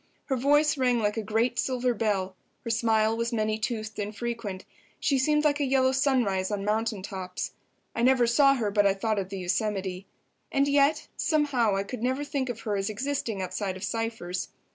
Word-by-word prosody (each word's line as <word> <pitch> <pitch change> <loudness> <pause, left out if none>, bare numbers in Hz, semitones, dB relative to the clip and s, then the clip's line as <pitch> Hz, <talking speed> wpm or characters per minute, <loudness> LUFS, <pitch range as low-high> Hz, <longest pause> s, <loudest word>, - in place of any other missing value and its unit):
Her 270 - 0
voice 290 +3 +3
rang 250 -2 +3
like 210 -2 0
a 225 - -1
great 220 +3 0
silver 250 -1 +1
bell; 200 -4 -1 0.3
her 230 - -2
smile 220 -1 +2
was 230 +1 -1
many 215 -1 0
toothed 220 -1 -3
and 210 0 -4
frequent; 230 -5 -4 0.3
she 275 -2 +2
seemed 300 +3 +2
like 295 -1 +2
a - - +1
yellow 260 -1 +3
sunrise 250 -9 +1
on 205 -2 -2
mountain 215 -1 -1
tops. 185 -2 -5 0.4
I 230 - -2
never 255 0 +4
saw 275 +4 +5
her 220 -5 -1
but 205 0 +4
I 195 - +2
thought 215 +1 0
of 190 -1 -4
the 195 - -5
Yosemite. 190 0 -2 0.4
And 275 0 +2
yet, 285 +1 +3
somehow, 285 -10 +2
I 195 - 0
could 220 +3 -7
never 260 +4 0
think 275 -3 -2
of 230 -2 -5
her 210 -2 -2
as 195 +1 -1
existing 225 -3 -2
outside 190 0 -3
of 190 - -9
Cypher's. 225 -5 -3
225 Hz, 195 wpm, -27 LUFS, 200-260 Hz, 0.4 s, saw